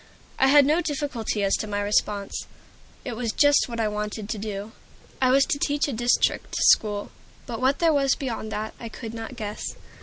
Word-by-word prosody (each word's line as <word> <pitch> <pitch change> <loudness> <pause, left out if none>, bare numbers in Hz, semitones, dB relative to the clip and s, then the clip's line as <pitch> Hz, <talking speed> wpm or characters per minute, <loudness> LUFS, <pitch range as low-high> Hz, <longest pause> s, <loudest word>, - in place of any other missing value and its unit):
I 265 - +5
had 285 0 +7
no 310 +5 +3
difficulty 280 -9 -2
as 195 - +3
to 215 - -4
my 205 -1 -2
response. 205 0 -1 0.6
It 245 -4 -4
was 230 -1 -2
just 290 0 +4
what 235 -1 -5
I 220 - +2
wanted 210 0 -4
to 220 - -3
do. 205 0 -5 0.5
I 255 - +4
was 270 +2 +5
to 285 - -1
teach 290 +1 +1
a 280 - -3
district 240 +2 +1
school; 205 -2 +3 0.3
but 235 0 -6
what 265 +2 +3
there 330 -2 +3
was 275 -2 +3
beyond 225 -5 -4
that, 215 +1 -4
I 230 - -7
could 225 0 -8
not 225 +2 -7
guess. 210 -3 -5
230 Hz, 200 wpm, -25 LUFS, 210-275 Hz, 0.6 s, had